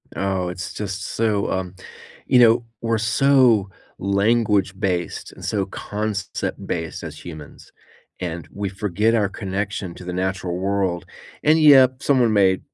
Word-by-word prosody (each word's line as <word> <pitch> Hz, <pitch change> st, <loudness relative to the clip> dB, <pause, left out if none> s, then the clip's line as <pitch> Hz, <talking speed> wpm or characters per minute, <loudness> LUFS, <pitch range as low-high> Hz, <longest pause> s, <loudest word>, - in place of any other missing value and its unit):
Oh, 95 Hz, -2 st, -1 dB
it's 90 Hz, +1 st, -6 dB
just 100 Hz, -1 st, -4 dB
so, 105 Hz, -1 st, 0 dB
um 95 Hz, -1 st, -3 dB, 0.5 s
you 125 Hz, -, +5 dB
know, 115 Hz, 0 st, +5 dB, 0.2 s
we're 115 Hz, -1 st, 0 dB
so 115 Hz, -2 st, +3 dB, 0.3 s
language 100 Hz, -1 st, +1 dB
based 90 Hz, -4 st, -2 dB
and -, -, -13 dB
so 100 Hz, -2 st, -1 dB
concept 105 Hz, 0 st, -4 dB
based 80 Hz, -1 st, -4 dB
as 80 Hz, -2 st, -8 dB
humans, 80 Hz, -4 st, -11 dB, 0.5 s
and 85 Hz, -2 st, -5 dB
we 100 Hz, -1 st, -3 dB
forget 105 Hz, +3 st, 0 dB
our 105 Hz, -3 st, +1 dB
connection 100 Hz, -1 st, -4 dB
to 90 Hz, -, -11 dB
the 90 Hz, -, -4 dB
natural 95 Hz, -1 st, -2 dB
world. 95 Hz, -2 st, -1 dB, 0.4 s
And, 155 Hz, +2 st, +5 dB
yep, 135 Hz, -4 st, +6 dB
someone 125 Hz, -5 st, +3 dB
may 95 Hz, -2 st, +4 dB
100 Hz, 140 wpm, -22 LUFS, 95-110 Hz, 0.5 s, yep